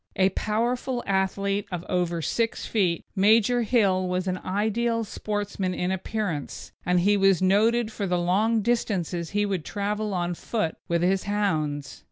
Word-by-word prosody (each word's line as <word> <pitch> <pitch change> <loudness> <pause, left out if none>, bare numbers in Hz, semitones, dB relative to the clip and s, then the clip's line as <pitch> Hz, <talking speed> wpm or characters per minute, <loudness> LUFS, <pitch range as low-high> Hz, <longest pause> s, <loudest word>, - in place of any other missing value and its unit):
A 190 0 +4
powerful 240 +5 -1
athlete 195 +1 0
of 175 -1 -4
over 175 -2 -1
six 230 +9 -1
feet, 180 -6 0
Major 220 +4 +4
Hill 200 -6 +2
was 180 0 -1
an 185 0 -1
ideal 225 +4 0
sportsman 205 -3 -3
in 180 +1 -1
appearance, 190 -5 -4
and 180 0 +2
he 205 +3 +4
was 195 -3 +4
noted 220 +5 +3
for 205 -2 -3
the 180 -1 +1
long 205 +6 +2
distances 185 -8 -1
he 205 0 +1
would 190 -5 -2
travel 210 +1 -2
on 175 0 -1
foot 175 -1 -2
with 170 0 +1
his 190 +1 +1
hounds. 155 -9 -1
195 Hz, 155 wpm, -26 LUFS, 180-215 Hz, -, A